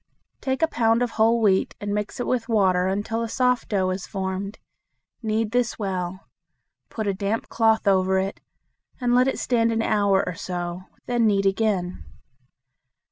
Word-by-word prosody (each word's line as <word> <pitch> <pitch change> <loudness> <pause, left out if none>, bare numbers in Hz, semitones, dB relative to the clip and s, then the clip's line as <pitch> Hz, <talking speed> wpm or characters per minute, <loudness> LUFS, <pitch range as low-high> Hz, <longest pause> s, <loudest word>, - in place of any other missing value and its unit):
Take 265 +3 -1
a - - +5
pound 230 -4 +2
of 245 - -2
whole 225 +2 +3
wheat 195 -4 +2
and 205 0 -3
mix 210 +3 -3
it 245 - -1
with 240 -2 -1
water 185 -4 +3
until 205 +4 -1
a 230 - -3
soft 250 +1 +1
dough 190 -3 +1
is 185 0 -4
formed. 195 +1 -4 0.6
Knead 220 -1 -1
this 245 -1 0
well. 185 -2 -4 0.6
Put 220 - -4
a 200 - +1
damp 200 +3 -2
cloth 225 -2 +2
over 190 -1 +3
it, 190 +1 -2 0.6
and 245 -1 +1
let 250 +1 +4
it 270 - 0
stand 230 -2 +1
an 225 0 0
hour 200 -3 +2
or 180 - -3
so. 175 +1 -5 0.2
Then 240 -2 +2
knead 200 -2 +2
again. 195 -3 0
210 Hz, 170 wpm, -24 LUFS, 190-230 Hz, 0.6 s, a